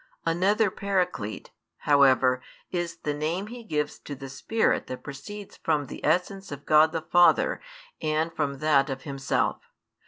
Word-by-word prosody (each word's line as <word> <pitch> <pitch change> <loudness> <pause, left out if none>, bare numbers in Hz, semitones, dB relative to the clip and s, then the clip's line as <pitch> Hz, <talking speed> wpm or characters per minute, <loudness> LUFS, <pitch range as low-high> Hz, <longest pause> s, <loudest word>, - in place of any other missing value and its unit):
Another 190 +5 +2
Paraclete, 180 - -2 0.3
however, 130 -3 +4 0.3
is 175 -2 -2
the 150 - 0
name 160 +6 -2
He 240 +2 -9
gives 150 -7 -2
to 145 - -7
the 135 0 -9
Spirit 220 +11 0
that 130 - -7
proceeds 200 +9 -9
from 150 -3 0
the - - -9
essence 180 +4 0
of 145 0 -8
God 155 +1 +5
the 165 -1 -3
Father 175 +1 +4 0.4
and 155 +1 0
from 140 -2 -1
that 145 -1 +3
of 135 0 -5
Himself. 135 -2 -1
155 Hz, 150 wpm, -26 LUFS, 140-180 Hz, 0.4 s, God